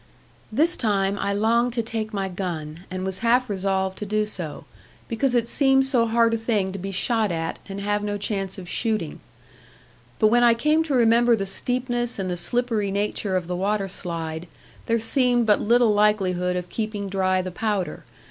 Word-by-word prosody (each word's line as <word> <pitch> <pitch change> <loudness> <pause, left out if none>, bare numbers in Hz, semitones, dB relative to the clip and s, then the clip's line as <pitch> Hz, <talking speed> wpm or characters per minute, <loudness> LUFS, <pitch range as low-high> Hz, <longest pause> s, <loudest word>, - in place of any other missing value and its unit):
This 315 +10 +2
time 200 -3 0
I 200 - -1
longed 230 +4 +2
to 235 -1 -1
take 220 -1 -4
my 195 -3 -2
gun, 175 -3 -5
and 185 0 -4
was 190 0 -3
half 245 +2 +2
resolved 190 -1 -1
to 210 - -4
do 215 +1 +1
so; 180 -7 -6 0.4
because 245 +2 0
it 235 -1 +2
seemed 270 0 +3
so 250 -4 +2
hard 230 0 +3
a - - +2
thing 215 -4 0
to 195 - -6
be 195 +2 -5
shot 215 +2 +1
at 165 -1 -3
and 195 0 -5
have 205 +1 -1
no 205 0 -2
chance 195 -2 -3
of 185 -2 -8
shooting; 215 -6 -1 1.0
but 215 - +4
when 240 +2 +4
I 235 -1 +6
came 300 +6 +2
to 290 -4 -1
remember 235 0 +4
the 195 -3 -3
steepness 245 +3 -1
and 190 -2 -2
the - - -1
slippery 230 +1 -1
nature 200 0 -1
of 180 - -3
the 180 +1 -3
waterslide, 175 -4 -3 0.4
there 230 - +2
seemed 245 +1 +2
but 210 -2 +3
little 235 0 +4
likelihood 190 -4 +2
of 180 0 -4
keeping 215 -2 -3
dry 185 -1 +1
the 185 - -5
powder. 205 -1 -2
210 Hz, 185 wpm, -24 LUFS, 190-235 Hz, 1.0 s, I